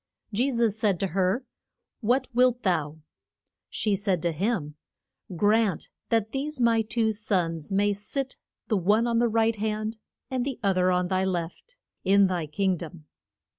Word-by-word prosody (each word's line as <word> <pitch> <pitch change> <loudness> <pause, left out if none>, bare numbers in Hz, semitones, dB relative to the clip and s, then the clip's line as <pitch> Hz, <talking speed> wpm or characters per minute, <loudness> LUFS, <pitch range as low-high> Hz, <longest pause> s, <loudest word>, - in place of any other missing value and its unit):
Je 245 +7 +2
sus 230 -5 +1
said 210 -5 +1
to 195 - -1
her, 190 +8 0 0.5
What 250 +3 +1
wilt 250 0 +3
thou? 160 -5 -1 0.7
She 210 -2 0
said 195 -2 0
to 170 - +1
him, 165 -3 -1 0.6
Grant 205 -1 +2 0.2
that 220 -1 +1
these 280 +2 -3
my 230 -2 +4
two 220 0 0
sons 175 -6 -2
may 205 +1 +2
sit, 260 +7 -4 0.3
the 215 - +1
one 205 +6 +3
on 235 -1 +1
thy 240 - +3
right 225 0 +2
hand, 215 +1 -2 0.3
and 255 -1 0
the 270 -1 -4
oth 195 -2 +2
er 180 0 +3
on 180 0 +1
thy 190 0 +1
left, 185 - -4 0.3
in 200 +1 +5
thy 180 -4 -1
king 185 +4 0
dom. 165 -1 -9
205 Hz, 165 wpm, -26 LUFS, 185-230 Hz, 0.7 s, in